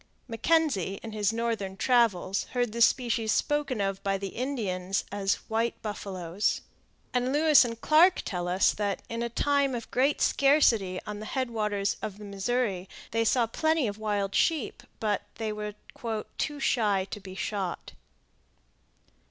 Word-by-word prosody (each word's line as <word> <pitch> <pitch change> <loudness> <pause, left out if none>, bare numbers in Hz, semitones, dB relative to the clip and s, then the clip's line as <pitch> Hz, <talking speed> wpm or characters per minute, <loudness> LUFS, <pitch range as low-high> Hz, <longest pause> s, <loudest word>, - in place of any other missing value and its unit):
Mackenzie, 230 - +1
in 225 - -6
his 210 -1 +1
northern 225 -4 -2
travels, 205 -7 +2
heard 245 -3 0
the 235 +2 -4
species 230 -2 +3
spoken 295 -4 0
of 195 -1 -1
by 195 0 0
the 195 0 -4
Indians 195 -7 -2
as 200 -1 +1
"white 225 +1 -1
buffaloes." 195 -3 -2 0.5
And 250 +1 +1
Lewis 300 0 +6
and 230 -2 -4
Clark 330 +8 +5
tell 175 -3 -3
us 180 +2 +3
that, 205 -2 -2
in 230 0 -3
a 235 - -1
time 280 +2 +1
of 230 - -7
great 275 +4 +2
scarcity 235 -10 +3
on 210 0 -5
the 215 - -7
head 260 -3 -2
waters 210 -3 -1
of 200 -2 -5
the 210 - -10
Missouri, 200 -1 -1 0.2
they 230 +1 +1
saw 235 +1 +3
plenty 315 +5 +1
of 205 -1 -4
wild 205 -2 -1
sheep, 315 0 +1 0.2
but 210 -3 0
they 220 -2 -3
were 210 -1 -5 0.6
"too 295 -1 -2
shy 210 -8 +2
to 210 - -5
be 190 -1 -10
shot." 195 -3 -3
220 Hz, 155 wpm, -28 LUFS, 195-250 Hz, 0.6 s, Lewis